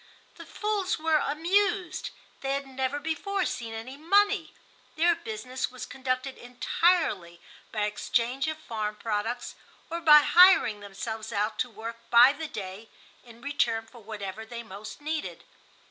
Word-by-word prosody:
The - - -11
fools 415 -3 -1
were 320 0 +2
amused. 360 +5 0 0.3
They 270 0 -1
had 275 0 -2
never 265 +1 -2
before 365 +5 -1
seen 230 -6 -4
any 250 +5 -7
money. 405 +6 +2 0.4
Their 340 +2 +4
business 250 -1 -4
was 255 0 -7
conducted 260 0 -3
entirely 245 - +1 0.3
by 215 -2 -1
exchange 235 +6 0
of 315 0 -2
farm 215 -7 -4
products 225 +3 -3 0.4
or 335 +1 -3
by 300 -2 +9
hiring 350 - +6
themselves 215 +2 -6
out 210 +1 -1
to 250 - 0
work 225 +1 -7
by 245 +3 +8
the 315 +2 -5
day 200 -1 -7 0.3
in 235 -1 -15
return 235 -6 0
for 235 +1 -15
whatever 205 -1 -6
they 235 +1 -7
most 210 +4 -9
needed. 310 +1 -4
255 Hz, 145 wpm, -28 LUFS, 220-315 Hz, 0.4 s, by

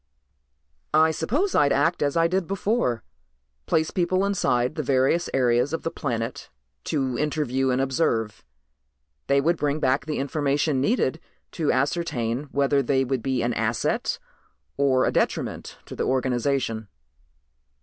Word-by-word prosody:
"I 160 +1 +5
suppose 270 - -1
I'd 140 -1 +4
act 145 +5 +2
as 145 +1 +1
I 165 0 +4
did 185 0 -1
before. 195 - 0 0.6
Place 160 0 +1
people 185 +2 +1
inside 125 -10 +1
the 155 - -3
various 135 +5 +1
areas 125 +2 +2
of 165 - -3
the 165 - -2
planet 120 -4 -4 0.4
to 135 -5 -1
interview 140 -3 0
and 125 0 +1
observe. 125 -5 0 0.8
They 140 - +3
would 165 +5 +1
bring 150 0 -1
back 135 +1 +1
the 155 - -2
information 140 0 0
needed 160 - +1 0.3
to 160 -4 0
ascertain 135 -3 -1
whether 140 0 +1
they 135 0 +1
would 130 -1 -1
be 130 -1 -1
an 120 0 0
asset 110 +1 -1 0.6
or 135 -2 +2
a - - +1
detriment - - -2
to - - -9
the - - -2
organization." 130 -3 0
140 Hz, 140 wpm, -24 LUFS, 130-160 Hz, 0.8 s, I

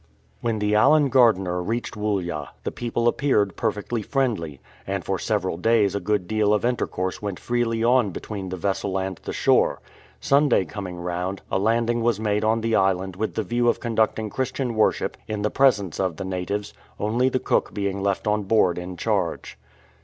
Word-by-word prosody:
When 115 -2 -1
the 105 0 0
Allen 140 +7 +5
Gardiner 95 -8 +3
reached 115 +6 -3
Woollya, 95 -8 -2 0.2
the - - -2
people 120 0 -1
appeared 120 -7 +2
perfectly 110 +1 -2
friendly, 105 - -1 0.3
and - - -3
for - - -1
several - - -1
days 110 +1 +3
a 100 - -1
good 100 -1 -1
deal 105 -1 +2
of 105 - -1
intercourse 95 -6 -2
went 100 -3 -4
freely 120 -2 0
on 120 -2 +4
between 95 +1 -6
the 95 - -4
vessel 95 +1 -1
and 95 -1 -3
the - - -7
shore. - - +2 0.4
Sunday 140 -8 +3
coming 95 -3 -6
round, 90 +2 -3
a - - +1
landing 115 +3 +1
was 115 -3 +1
made 105 -1 0
on 110 +1 +2
the 115 0 +1
island 95 -1 +1
with 110 +3 -3
the 110 - 0
view 120 +4 0
of - - 0
conducting 110 -2 0
Christian 130 0 -2
worship 110 -1 +1
in 105 -1 -3
the 105 - 0
presence 105 - +2
of 95 -4 0
the 95 - -4
natives, 100 +3 -3 0.3
only 115 +5 +1
the 130 - 0
cook - - 0
being 100 -1 -2
left 100 -1 -1
on 105 0 +1
board 95 -4 +3
in 90 0 -7
charge. - - -2
105 Hz, 185 wpm, -24 LUFS, 95-115 Hz, 0.4 s, Allen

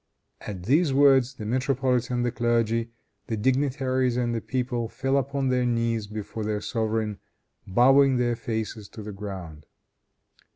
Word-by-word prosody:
At 95 -4 -6
these 145 - +3
words 135 -2 +5
the 110 - -7
metropolitan, 125 0 0
the 120 - 0
clergy, 115 -1 0 0.4
the 110 - -2
dignitaries 130 0 +1
and 120 -1 0
the 115 - -2
people 125 -2 -2
fell 135 +2 -1
upon 140 0 0
their 125 -1 +2
knees 115 -2 0
before 105 +1 -6
their 105 0 -1
sovereign, 110 -1 -2 0.5
bowing 135 +6 +5
their 120 -1 +1
faces 110 -2 -4
to 110 - -8
the 105 - -6
ground. 95 -7 -8
120 Hz, 140 wpm, -26 LUFS, 110-130 Hz, 0.5 s, words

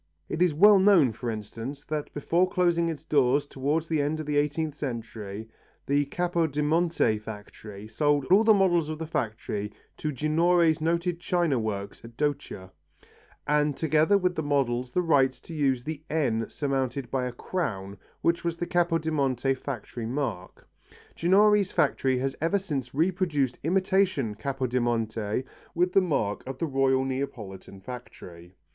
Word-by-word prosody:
It 160 - -3
is 180 -2 +4
well 205 +4 +7
known, 185 - +5
for 120 +2 -5
instance, 115 +6 -6
that 150 -1 -4
before 170 +5 +1
closing 170 -2 +2
its 160 -1 -6
doors 140 -1 +2
towards 145 +4 -1
the 155 -2 +1
end 150 +2 -1
of 155 - -4
the 150 0 -1
eighteenth 150 +1 0
century, 115 -6 -6 0.4
the 145 +1 +2
Capodimonte 165 -6 +1
factory 105 -1 -9
sold 145 +5 +1
all 200 +4 +7
the 225 - +5
models 175 -6 +3
of 155 - -4
the 160 - -5
factory 110 -7 -3 0.3
to 155 - -2
Ginori's 160 +3 +2
noted 170 +2 0
china 175 -7 +1
works 100 -3 -4
at 115 0 -13
Doccia, 140 -10 -3 0.7
and 150 -1 +1
together 160 +5 +3
with 180 -2 0
the 160 - -2
models 130 -4 0
the 180 - +1
right 140 -5 +4
to 165 - -12
use 135 -5 +1
the 155 +1 -5
N 125 -8 0
surmounted 135 -3 -2
by 130 -2 0
a - - -4
crown 105 - -4 0.3
which 170 0 +1
was 170 -1 -2
the 175 - -2
Capodimonte 155 -7 +1
factory 120 -3 -6
mark. 115 -8 -4 0.5
Ginori's 200 +3 +4
factory 135 -3 +1
has 135 +1 -2
ever 165 +5 +2
since 140 -10 -4
reproduced 160 -6 0
imitation 185 - +1
Capodimonte 120 -3 -1 0.3
with 180 +1 +1
the 195 - +6
mark 140 - -1
of 135 -1 -5
the 165 - -1
Royal 135 -2 +2
Neapolitan 115 -8 -5
factory. 95 -6 -10
145 Hz, 150 wpm, -27 LUFS, 125-165 Hz, 0.7 s, well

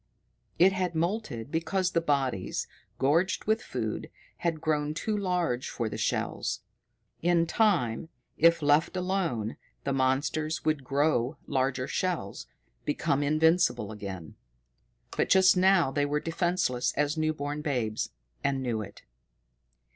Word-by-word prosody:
It 190 +3 +6
had 180 -3 -1
moulted 165 - -2
because 180 +3 0
the 165 - +1
bodies, 135 - -1 0.3
gorged 165 +7 +2
with 220 +2 +2
food, - - -4 0.3
had 165 -2 -1
grown 150 -1 0
too 215 +5 -1
large 180 -10 -1
for 115 -3 -2
the - - -5
shells. - - -1 0.6
In 170 0 +3
time, 165 - +1 0.3
if 165 0 +4
left 150 +5 +3
alone, 180 - -1 0.3
the 140 - -1
monsters 140 +4 0
would 155 -3 +1
grow 140 0 +1
larger 130 -1 0
shells, 165 - -2 0.4
become 140 - 0
invincible 155 - +2
again. 95 -6 -7 0.8
But - - +1
just 190 0 +6
now 185 -5 +4
they 145 +1 +1
were 150 +1 0
defenseless 165 -6 0
as 150 +1 0
new 155 0 +1
born 145 0 -4
babes 120 -8 -1 0.3
and 135 -1 0
knew 115 -4 -1
it. 100 -1 -10
155 Hz, 130 wpm, -28 LUFS, 130-175 Hz, 0.8 s, It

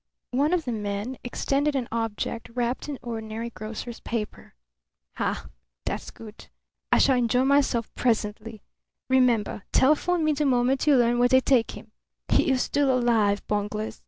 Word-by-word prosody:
One 280 +5 +1
of 360 -3 0
the 245 - -2
men 210 +3 -4
extended 280 +4 0
an 255 -3 -1
object 225 0 -3
wrapped 245 +4 -2
in 285 - -4
ordinary 225 0 -5
grocer's 225 +2 -7
paper. 220 - -5 0.6
"Ha! - - -2 0.4
That's - - -4
good. 220 -1 -12 0.4
I - - +5
shall 265 -2 +4
enjoy 245 +1 +2
myself 270 -5 +2
presently. 220 -2 -2 0.5
Remember: 245 -6 +2
telephone 315 +5 +3
me 310 - +3
the 295 0 0
moment 255 +2 +1
you 290 - +6
learn 240 -1 +3
where 245 0 +4
they 260 0 +6
take 255 -3 +1
him. 220 - -14 0.4
He - - +3
is 260 -1 +2
still 285 -1 +1
alive, 230 -5 +2
bunglers! 210 +1 -3
240 Hz, 155 wpm, -25 LUFS, 220-265 Hz, 0.6 s, you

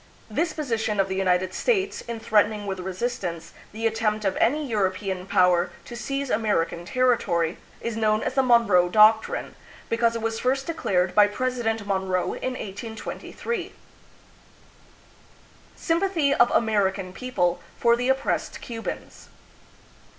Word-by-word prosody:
This 320 +9 0
position 225 -9 -2
of 195 0 +2
the 190 - -2
United 185 -1 +1
States 400 - 0
in 235 -1 -4
threaten 215 -1 +3
ing 210 -1 -6
with 190 -1 -4
resistance 185 -2 -4 0.2
the 225 +2 -5
attempt 215 -1 0
of 195 - +1
any 295 +5 +2
European 190 -3 -1
power 180 -1 +3 0.2
to 240 - -8
seize 275 +3 -3
American 175 -6 0
territory 195 -8 +1 0.2
is 230 -1 -3
known 215 -1 +1
as - - -2
the 270 - +3
Monroe 230 -8 +4
Doc 215 +3 +6
trine, - - -5 0.4
because 230 0 +2
it 230 - -3
was 225 0 -1
first 265 +2 0
declared 185 - 0
by 210 -1 +6
President 225 -1 -2
Monroe 190 -2 -1
in 255 - -3
1823. 220 - -6 2.0
Sympathy 335 -4 +1
of 240 -3 +4
American 195 -4 +1
People 185 -8 -1 0.2
for 235 0 +4
the 245 +2 -1
Oppressed 265 0 -1
Cubans. 230 -2 -7
220 Hz, 135 wpm, -25 LUFS, 190-245 Hz, 2.0 s, Doc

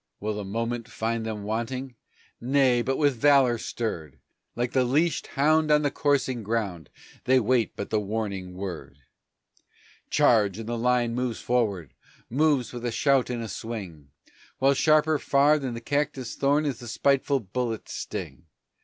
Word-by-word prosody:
Will 105 +1 -2
the 105 0 -4
moment 115 +3 -3
find 115 0 -2
them 105 -2 -4
wanting! 120 +5 -3 0.5
Nay, 130 -1 +3
but 135 +2 -1
with 145 -4 +2
valor 135 -3 +4
stirred! 85 - -4 0.4
Like 120 0 -1
the 130 - +2
leashed 150 +6 +1
hound 155 +2 +3
on 150 0 +4
the 145 - +1
coursing 135 -5 0
ground 100 - -3 0.4
they 130 +1 +5
wait 120 -1 +1
but 100 - -6
the 110 - +2
warning 100 -3 -4
word. 90 -7 -7 1.1
"Charge!" 105 -5 +3
and 115 -1 -7
the 120 - -2
line 120 0 +1
moves 125 -1 -2
forward, 105 - -1 0.4
moves 140 -2 +1
with 120 -1 -7
a 120 - -1
shout 135 +2 +2
and 120 -2 -3
a - - -5
swing, 95 -11 -7 0.5
While 135 +1 +4
sharper 155 +1 +3
far 145 +2 +3
than 130 -4 -4
the 115 - -6
cactus 140 -1 -2
thorn 145 +2 +2
is 135 -5 -2
the 120 - -9
spiteful 140 +3 +1
bullet's 115 +2 -4
sting. - - -6
120 Hz, 160 wpm, -26 LUFS, 110-135 Hz, 1.1 s, they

